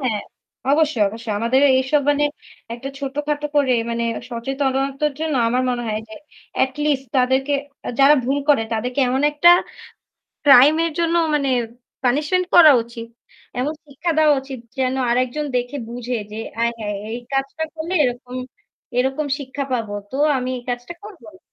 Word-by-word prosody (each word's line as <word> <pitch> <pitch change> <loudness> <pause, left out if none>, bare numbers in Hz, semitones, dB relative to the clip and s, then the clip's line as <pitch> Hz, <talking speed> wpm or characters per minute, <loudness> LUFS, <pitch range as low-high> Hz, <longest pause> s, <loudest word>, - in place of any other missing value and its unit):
হ্যাঁ, 230 -6 -1 0.5
অবশ্যই, 295 -6 +2
অবশ্যই। 225 0 -5
আমাদের 235 +4 +2 0.2
এসব 285 +2 +1
মানে 290 0 +2 0.5
একটা 260 +3 -7
ছোটখাটো 295 +1 -2
করে 270 -3 +3 0.2
মানে 235 0 -1 0.3
সচেতনতার 270 +3 -1
জন্য 315 -3 -1
আমার 250 +2 +1
মনে 240 -1 -2
হয় 215 0 -2
যে 220 - -10 0.5
এটলিস্ট 270 0 -2
তাদেরকে 260 +3 +2 0.5
যারা 280 +2 +7
ভুল 275 +3 0
করে 280 -6 +5
তাদেরকে 245 +5 -1
এমন 265 +3 0
একটা 295 +4 +4 1.0
ক্রাইম 280 +1 +8
এর 330 - -2
জন্য 335 0 +1 0.2
মানে 280 -2 0 0.5
পানিশমেন্ট 300 +8 +1
করা 320 -4 +9
উচিত। 230 0 -9 0.5
এমন 295 +5 -1
শিক্ষা 300 +5 -3
দেওয়া 305 -1 +5
উচিত 265 -2 -8 0.2
যেন 260 0 +1 0.2
আরেকজন 255 +5 0
দেখে 245 +3 -2
বুঝে 245 +1 -4 0.2
যে 215 - -7 0.3
আয়হায়! 225 -3 -2 0.2
এই 240 - -4
কাজটা 275 +4 -1
করলে 325 +3 -5
এরকম, 245 0 -3 0.6
এরকম 265 +4 0
শিক্ষা 280 0 -5
পাবো। 225 -4 -2 0.2
তো - - -5 0.2
আমি 255 0 -3
এই 245 - -10
কাজটা 245 +7 -4
করবো 395 - -12
না। - - -19
265 Hz, 150 wpm, -21 LUFS, 245-295 Hz, 1.0 s, করা